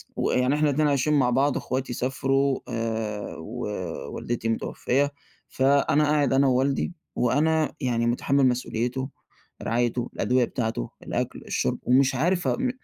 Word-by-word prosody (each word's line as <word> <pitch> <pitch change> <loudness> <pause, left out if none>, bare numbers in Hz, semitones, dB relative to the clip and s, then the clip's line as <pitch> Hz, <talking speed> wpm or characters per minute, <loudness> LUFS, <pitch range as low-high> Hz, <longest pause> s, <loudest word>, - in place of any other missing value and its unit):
ويعني 125 +3 +1
إحنا 150 0 +2
الاتنين 150 +2 +2
عايشين 145 +1 +2
مع 135 -4 +3
بعض، 135 +3 +2
أخواتي 130 0 -3
سافرو 135 +2 0
آآ 110 -3 -3
و 110 +10 -7 0.6
والدتي 115 -1 -3
متوفية، 135 +5 0 0.4
فأنا 140 +2 +3
قاعد 145 -2 +2
أنا 135 +1 +4
ووالدي، 135 +6 +1 0.2
وأنا 155 +5 +2
يعني 120 -3 0
مُتحمل 135 +3 +2
مسؤوليته، 125 +1 -1 0.5
رعايته، 120 +1 0
الأدوية 125 0 +2
بتاعته، 110 - -3
الأكل، - - -3
الشرب، - - -1
ومش 130 +1 +3
عارف 175 +7 +1
م 255 +1 +1
130 Hz, 130 wpm, -25 LUFS, 120-140 Hz, 0.6 s, أنا